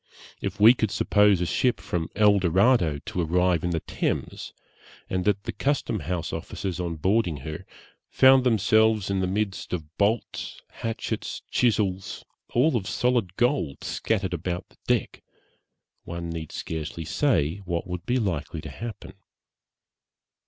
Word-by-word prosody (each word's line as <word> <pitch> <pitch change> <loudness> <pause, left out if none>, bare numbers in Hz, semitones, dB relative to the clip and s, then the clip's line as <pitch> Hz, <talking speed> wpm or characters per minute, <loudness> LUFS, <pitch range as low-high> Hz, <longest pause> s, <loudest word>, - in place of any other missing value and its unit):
If - - -4
we 110 +3 +9
could 110 -4 -1
suppose 105 -1 +3
a - - +1
ship 125 +7 +1
from 85 -2 -3
El 105 -1 +5
Dorado 95 - +3
to 90 - -2
arrive 90 0 +2
in 90 - 0
the 85 -2 -1
Thames, - - -3 0.6
and 90 -1 -1
that 100 -1 +1
the - - -3
custom 140 -6 -1
house 90 -2 -3
officers, 95 -4 -4
on 85 -2 -2
boarding 95 0 +1
her, 75 0 -6 0.4
found 130 0 +6
themselves 110 -3 +3
in 95 - +1
the 95 - 0
midst 100 0 -2
of 80 -2 -5
bolts, 105 +3 -1
hatchets, 115 -1 -4
chisels, 100 -6 0 0.3
all 130 +5 +4
of 100 -5 -1
solid 120 -8 0
gold, 120 - 0
scattered 95 -5 -1
about 90 +1 -3
the - - -26
deck, - - 0 0.8
one 85 0 -5
need 80 -2 -6
scarcely 80 +1 -5
say 95 - +1
what 85 -2 -2
would 90 -2 -6
be 125 - +2
likely 85 - -2
to - - -8
happen. 115 -4 -8
95 Hz, 145 wpm, -26 LUFS, 85-110 Hz, 0.8 s, we